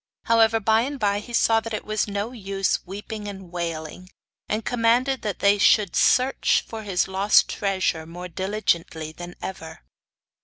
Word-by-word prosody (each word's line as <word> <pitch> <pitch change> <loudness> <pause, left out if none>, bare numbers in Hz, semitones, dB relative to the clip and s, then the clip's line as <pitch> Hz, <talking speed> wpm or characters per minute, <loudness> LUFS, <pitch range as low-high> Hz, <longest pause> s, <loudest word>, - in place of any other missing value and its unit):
However, 225 -1 +4
by 220 +1 +3
and 275 +3 -4
by 205 -2 +1
he 210 - -11
saw 225 -1 +3
that 225 -1 -5
it - - -6
was 215 0 -1
no 205 +3 -3
use 195 -5 -1
weeping 205 +2 -7
and 190 -3 -9
wailing, 170 +1 -5 0.4
and 215 0 -2
commanded 245 +3 +1
that 205 -4 -3
they 200 +1 +4
should 200 -1 +4
search 260 +2 +3
for 225 -1 -7
his 195 -4 0
lost 195 +2 +4
treasure 190 -5 -1
more 175 +2 -8
diligently 170 -4 -2
than 175 +2 -9
ever. 160 -4 -7
205 Hz, 160 wpm, -24 LUFS, 180-225 Hz, 0.4 s, However